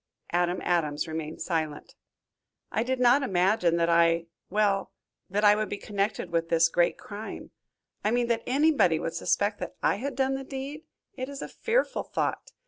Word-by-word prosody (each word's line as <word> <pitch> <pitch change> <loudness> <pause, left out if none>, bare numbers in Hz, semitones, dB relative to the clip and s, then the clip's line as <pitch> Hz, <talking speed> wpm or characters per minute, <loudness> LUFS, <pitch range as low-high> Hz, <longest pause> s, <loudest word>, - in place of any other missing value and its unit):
Adam 175 +1 +1
Adams 155 -3 0
remained 160 -1 -5
silent. 155 -4 -3 0.8
"I - - 0
did 255 +2 -1
not 250 +3 +5
imagine 185 -6 +2
that 170 0 +2
I 170 0 +3 0.2
well, 200 -1 +1 0.4
that 205 +3 0
I 205 - +8
would 215 0 -2
be 205 - -3
connected 200 -3 -2
with 165 0 0
this 165 0 +4
great 175 +1 +2
crime. 210 +1 -8 0.5
I 210 - +2
mean, 240 +1 +2
that 230 -1 +1
anybody 265 - +3
would 165 - -3
suspect 205 +1 0
that 180 - -6
I - - +3
had 270 +4 -4
done 265 0 +1
the 270 0 -3
deed. 275 +3 -6 0.3
It 260 -6 -5
is 280 0 -6
a - - -5
fearful 480 +2 0
thought! - - -3
205 Hz, 175 wpm, -27 LUFS, 170-250 Hz, 0.8 s, I